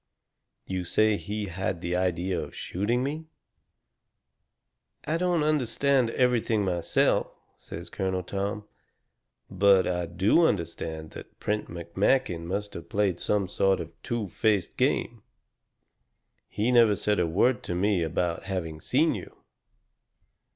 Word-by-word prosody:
"You 95 Hz, -1 st, -3 dB
say 110 Hz, +4 st, +3 dB
he 105 Hz, +1 st, -4 dB
had 95 Hz, -1 st, -3 dB
the 90 Hz, 0 st, -2 dB
idea 90 Hz, 0 st, 0 dB
of -, -, -8 dB
shooting 115 Hz, +7 st, -1 dB
me." 155 Hz, +4 st, -4 dB, 1.8 s
"I 160 Hz, +3 st, 0 dB
don't 175 Hz, -2 st, +1 dB
understand 140 Hz, -3 st, +2 dB
everything 115 Hz, -4 st, +1 dB
myself," 90 Hz, -3 st, +1 dB, 0.3 s
says 85 Hz, +2 st, -9 dB
Colonel 95 Hz, -2 st, -2 dB
Tom. 100 Hz, +3 st, -3 dB, 0.8 s
"But 95 Hz, 0 st, +4 dB
I 90 Hz, -1 st, -1 dB
do 95 Hz, -, +3 dB
understand 80 Hz, -3 st, -3 dB
that -, -, -12 dB
Prent 105 Hz, 0 st, -2 dB
McMakin 85 Hz, +2 st, 0 dB
must 100 Hz, +4 st, -3 dB
have 85 Hz, 0 st, -9 dB
played 100 Hz, -4 st, 0 dB
some 100 Hz, -2 st, 0 dB
sort 95 Hz, +1 st, +2 dB
of 80 Hz, -, -5 dB
a -, -, -28 dB
two 115 Hz, -3 st, -3 dB
faced 100 Hz, 0 st, 0 dB
game. -, -, 0 dB, 1.3 s
He 110 Hz, +4 st, 0 dB
never 115 Hz, -4 st, +5 dB
said 105 Hz, +2 st, 0 dB
a 90 Hz, -, +2 dB
word 120 Hz, +10 st, +2 dB
to 90 Hz, -, -3 dB
me 95 Hz, 0 st, +2 dB
about 85 Hz, +1 st, -1 dB
having 85 Hz, -5 st, -4 dB
seen -, -, +2 dB
you. -, -, -8 dB
95 Hz, 130 wpm, -27 LUFS, 90-110 Hz, 1.8 s, never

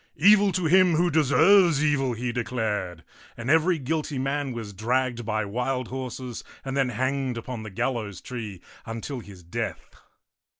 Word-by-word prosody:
" -, -, -43 dB, 0.2 s
Evil 205 Hz, -2 st, +5 dB
to 185 Hz, -2 st, 0 dB
him 180 Hz, +1 st, +5 dB
who 175 Hz, +2 st, +2 dB
deserves 160 Hz, +2 st, +5 dB
evil," 135 Hz, -4 st, +1 dB
he 120 Hz, +1 st, -3 dB
declared; 110 Hz, -8 st, -2 dB, 0.3 s
and 120 Hz, +3 st, -2 dB
every 165 Hz, +2 st, +4 dB
guilty 150 Hz, +1 st, -2 dB
man 135 Hz, +1 st, -1 dB
was 115 Hz, -4 st, -6 dB
dragged 120 Hz, +3 st, -1 dB
by 110 Hz, -1 st, 0 dB
wild 125 Hz, +4 st, -2 dB
horses 130 Hz, -2 st, -5 dB, 0.2 s
and 135 Hz, 0 st, -3 dB
then 135 Hz, -2 st, +2 dB
hanged 130 Hz, +1 st, -1 dB
upon 115 Hz, 0 st, -5 dB
the 110 Hz, -, -7 dB
gallows 110 Hz, -2 st, -2 dB
tree 110 Hz, -7 st, -7 dB, 0.3 s
until 115 Hz, +4 st, -5 dB
his 100 Hz, -5 st, -12 dB
death. 85 Hz, -, -5 dB
125 Hz, 160 wpm, -26 LUFS, 115-145 Hz, 0.3 s, Evil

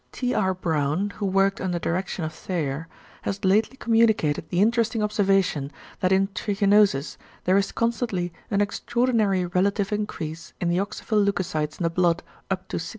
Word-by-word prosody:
T. 250 Hz, -1 st, -2 dB
R. 190 Hz, -2 st, +1 dB
Brown, 160 Hz, +2 st, 0 dB
who 205 Hz, -, -1 dB
worked 195 Hz, +1 st, +2 dB
under 180 Hz, -2 st, -1 dB
direction 175 Hz, 0 st, -2 dB
of 155 Hz, -, -5 dB
Thayer, 160 Hz, -3 st, -3 dB, 0.3 s
has 195 Hz, 0 st, -3 dB
lately 215 Hz, +7 st, +2 dB
communicated 220 Hz, -, +2 dB
the 175 Hz, -, 0 dB
interesting 230 Hz, +1 st, +2 dB
observation 195 Hz, -8 st, +1 dB, 0.3 s
that 185 Hz, -, +1 dB
in 190 Hz, +1 st, +4 dB
=trichinosis= 200 Hz, -6 st, +2 dB, 0.3 s
there 185 Hz, -, +3 dB
is 195 Hz, 0 st, +2 dB
constantly 225 Hz, -7 st, -1 dB, 0.2 s
an 200 Hz, -1 st, +1 dB
extraordinary 210 Hz, -2 st, +1 dB
relative 195 Hz, +3 st, 0 dB
increase 165 Hz, -6 st, -4 dB
in 175 Hz, -, 0 dB
the 175 Hz, -, +1 dB
oxyphil 210 Hz, +1 st, 0 dB
leucocytes 175 Hz, -6 st, -1 dB
in -, -, -2 dB
the 165 Hz, -, +1 dB
blood, 175 Hz, 0 st, +2 dB, 0.3 s
up 190 Hz, 0 st, -2 dB
to -, -, -2 dB
68%. 170 Hz, +2 st, -4 dB
190 Hz, 160 wpm, -25 LUFS, 175-210 Hz, 0.3 s, in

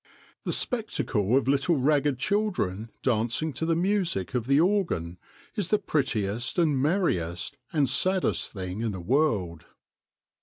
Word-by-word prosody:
The -, -, -1 dB
spectacle 130 Hz, -, 0 dB
of 135 Hz, -, 0 dB
little 140 Hz, +5 st, +2 dB
ragged 145 Hz, 0 st, +2 dB
children 135 Hz, -, -1 dB
dancing 120 Hz, +6 st, 0 dB
to 160 Hz, +6 st, -3 dB
the 165 Hz, -, +2 dB
music 175 Hz, -, 0 dB
of 120 Hz, -2 st, -1 dB
the 140 Hz, +1 st, +4 dB
organ 165 Hz, -, 0 dB, 0.4 s
is 205 Hz, -6 st, -1 dB
the 210 Hz, -, +3 dB
prettiest 120 Hz, -, -1 dB
and 160 Hz, -5 st, +3 dB
merriest 140 Hz, -, 0 dB, 0.2 s
and 145 Hz, -4 st, +2 dB
saddest 185 Hz, +7 st, +1 dB
thing 95 Hz, 0 st, -5 dB
in 115 Hz, -2 st, -1 dB
the 95 Hz, -, -5 dB
world. 95 Hz, -, 0 dB
135 Hz, 140 wpm, -27 LUFS, 105-170 Hz, 0.4 s, the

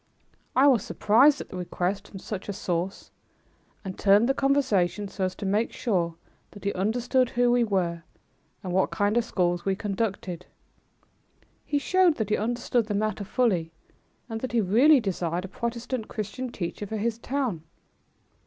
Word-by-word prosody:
I 265 Hz, -, +5 dB
was 255 Hz, -8 st, +5 dB
surprised 270 Hz, +8 st, +4 dB
at -, -, -9 dB
the 185 Hz, -, -7 dB
request 180 Hz, +2 st, -2 dB
from 195 Hz, -, -10 dB
such 195 Hz, +1 st, -6 dB
a -, -, -1 dB
source 180 Hz, 0 st, -3 dB, 0.7 s
and 190 Hz, -1 st, -6 dB
turned 205 Hz, +3 st, +5 dB
the 270 Hz, -, +3 dB
conversation 220 Hz, -9 st, +1 dB
so 195 Hz, -1 st, -2 dB
as 185 Hz, 0 st, -3 dB
to 205 Hz, -, -6 dB
make 210 Hz, +4 st, +1 dB
sure 175 Hz, -7 st, -1 dB, 0.3 s
that 205 Hz, -, -13 dB
he 200 Hz, -, 0 dB
understood 245 Hz, +6 st, +1 dB
who 245 Hz, 0 st, +2 dB
we 245 Hz, 0 st, +4 dB
were 180 Hz, -6 st, 0 dB, 0.6 s
and 180 Hz, -2 st, -4 dB
what 190 Hz, -, +2 dB
kind 205 Hz, +1 st, 0 dB
of 240 Hz, -, +3 dB
schools 175 Hz, -5 st, 0 dB
we 195 Hz, -1 st, 0 dB
conducted. 195 Hz, -4 st, -3 dB, 1.2 s
He 290 Hz, -, +1 dB
showed 360 Hz, +3 st, +3 dB
that 220 Hz, -5 st, -2 dB
he -, -, +4 dB
understood 240 Hz, +1 st, 0 dB
the 210 Hz, -, -2 dB
matter 215 Hz, 0 st, -1 dB
fully, 200 Hz, -7 st, +1 dB, 0.6 s
and 225 Hz, -2 st, -5 dB
that 255 Hz, -, -4 dB
he 235 Hz, -, +3 dB
really 250 Hz, +10 st, +5 dB
desired 180 Hz, -4 st, -2 dB
a -, -, -6 dB
Protestant 235 Hz, +2 st, -4 dB
Christian 230 Hz, +4 st, -5 dB
teacher 200 Hz, 0 st, -5 dB
for 220 Hz, -, -4 dB
his 225 Hz, +2 st, -1 dB
town. 250 Hz, -, -2 dB
210 Hz, 170 wpm, -26 LUFS, 190-240 Hz, 1.2 s, I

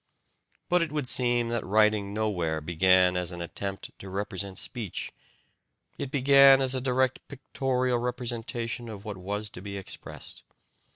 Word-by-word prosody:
But 180 Hz, 0 st, +3 dB
it 165 Hz, -3 st, -1 dB
would 150 Hz, -4 st, -2 dB
seem 120 Hz, -2 st, +2 dB
that 120 Hz, -1 st, -1 dB
writing 105 Hz, 0 st, +2 dB
nowhere 95 Hz, -7 st, -1 dB
began 90 Hz, +3 st, +3 dB
as 90 Hz, -1 st, -1 dB
an 90 Hz, -, -7 dB
attempt 95 Hz, +3 st, -5 dB
to 95 Hz, -, -9 dB
represent 100 Hz, 0 st, -4 dB
speech 110 Hz, -6 st, -5 dB, 0.9 s
it 140 Hz, -, -3 dB
began 140 Hz, 0 st, +7 dB
as 130 Hz, -1 st, +2 dB
a 130 Hz, -, -1 dB
direct 130 Hz, 0 st, +1 dB
pictorial 130 Hz, -2 st, -1 dB
representation 120 Hz, -1 st, -3 dB
of 105 Hz, -1 st, -9 dB
what 105 Hz, -2 st, -5 dB
was 105 Hz, +3 st, -4 dB
to 90 Hz, -, -9 dB
be 100 Hz, 0 st, -6 dB
expressed. 95 Hz, -, -8 dB
110 Hz, 150 wpm, -28 LUFS, 95-125 Hz, 0.9 s, began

